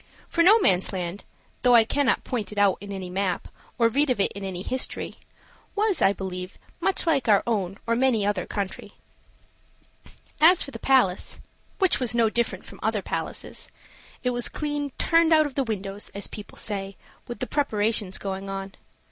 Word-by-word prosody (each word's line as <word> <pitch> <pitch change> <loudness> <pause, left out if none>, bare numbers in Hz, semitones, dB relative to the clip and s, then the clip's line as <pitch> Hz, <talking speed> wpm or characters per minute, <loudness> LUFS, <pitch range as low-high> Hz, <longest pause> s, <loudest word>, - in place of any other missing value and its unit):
For 335 - +1
Nomansland, 190 - +3 0.4
though 245 -1 +5
I 230 - +8
cannot 275 +4 +1
point 230 -5 -3
it 210 - -9
out 200 -2 +3
in 200 0 -8
any 190 -2 -5
map, 185 0 -2 0.3
or 230 - +4
read 280 +5 +1
of 250 - +1
it 195 - +2
in 200 - -8
any 185 -2 -4
history, 260 +4 -3 0.6
was, 420 -2 +2
I 195 - +5
believe, 185 -2 -6 0.2
much 385 - +2
like 290 -7 +1
our 205 -2 +5
own 200 -5 -1
or 230 0 +1
many 245 -4 +2
another 205 -3 -1
country. 200 -2 -5 1.5
As 335 +3 +7
for 280 - -8
the - - -8
palace 250 -9 +2 0.4
which 380 -3 +3
was 240 -3 0
no 230 -2 +3
different 235 0 -1
from - - -12
other - - 0
palaces - - -4 0.5
it 250 - +1
was 245 -1 -1
clean 290 -1 -3
"turned 330 -1 +3
out 310 -1 +5
of 290 - -5
the 275 - 0
windows," 205 -3 -4
as 200 - -1
people 210 - -9
say, 195 -2 -4 0.3
with 240 - -6
the 255 - -3
preparations 215 -8 0
going 195 0 -5
on. 195 0 -5
220 Hz, 175 wpm, -25 LUFS, 195-270 Hz, 1.5 s, I